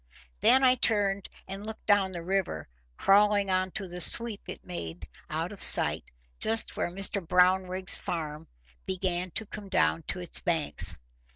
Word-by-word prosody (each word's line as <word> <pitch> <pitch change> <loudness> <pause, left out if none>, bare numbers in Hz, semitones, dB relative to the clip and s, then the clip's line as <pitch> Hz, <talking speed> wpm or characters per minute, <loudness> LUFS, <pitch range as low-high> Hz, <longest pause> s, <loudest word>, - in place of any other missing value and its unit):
Then 265 +1 +3
I 255 -1 +5
turned 205 -5 -1 0.2
and 195 +1 -8
looked 220 0 -8
down 200 -2 +2
the 170 -2 -8
river 180 - -3 0.3
crawling 205 0 +2
on 185 0 0
to 195 - -5
the 180 0 -7
sweep 230 +4 +2
it - - -9
made 85 - -7 0.3
out - - -4
of - - -9
sight - - +6 0.3
just 225 +1 0
where - - -3
Mr 195 +2 -1
Brownrigg's 185 +1 +3
farm 155 -2 -6 0.4
began 185 -1 -2
to 225 - -2
come 205 -1 -11
down 80 - 0
to - - -4
its 175 -2 -3
banks. 165 -3 0
190 Hz, 160 wpm, -27 LUFS, 175-205 Hz, 0.4 s, sight